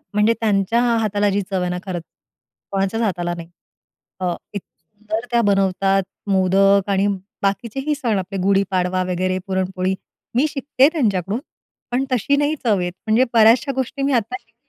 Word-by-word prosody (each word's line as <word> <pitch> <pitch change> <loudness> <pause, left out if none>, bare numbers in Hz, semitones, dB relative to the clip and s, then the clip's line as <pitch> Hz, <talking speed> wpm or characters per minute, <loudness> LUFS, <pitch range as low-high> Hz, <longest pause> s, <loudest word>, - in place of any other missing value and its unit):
म्हणजे 210 +2 +4
त्यांच्या 210 +1 +2 0.2
हाताला 205 -1 +1
जी 200 +1 0
चव 190 -2 0
आहे 180 - -1
ना, 180 - -2
खरंच 175 -3 -4 0.7
कोणाच्याच 195 +3 0
हाताला 175 -5 -1
नाही. 165 0 -9 0.7
अ, 180 -2 -1 0.2
इतकी 200 - -2 0.2
सुंदर 215 +6 -5
त्या 235 0 +3
बनवतात, 195 -1 +2 0.3
मोदक 195 +1 +3
आणि 195 0 +2 0.3
बाकीचेही 235 +9 -1
सण 235 -7 0
आपले 195 +1 -5
गुढीपाडवा 185 -2 +1
वगैरे 185 +1 0
पुरणपोळी. 190 0 -1 0.4
मी 265 - +4
शिकतेय 275 -1 +2
त्यांच्याकडून. 205 - 0 0.5
पण 250 +2 +1
तशी 255 +4 +2
नाही 290 +2 +1
चव 215 -5 +2
येत. 175 -1 -2
म्हणजे 220 +4 +4
बऱ्याचश्या 235 +5 +5
गोष्टी 265 +2 -3
मी 275 0 +1
आत्ता 240 +1 0
शिकतेय. 230 -2 -36
200 Hz, 155 wpm, -20 LUFS, 190-235 Hz, 0.7 s, बऱ्याचश्या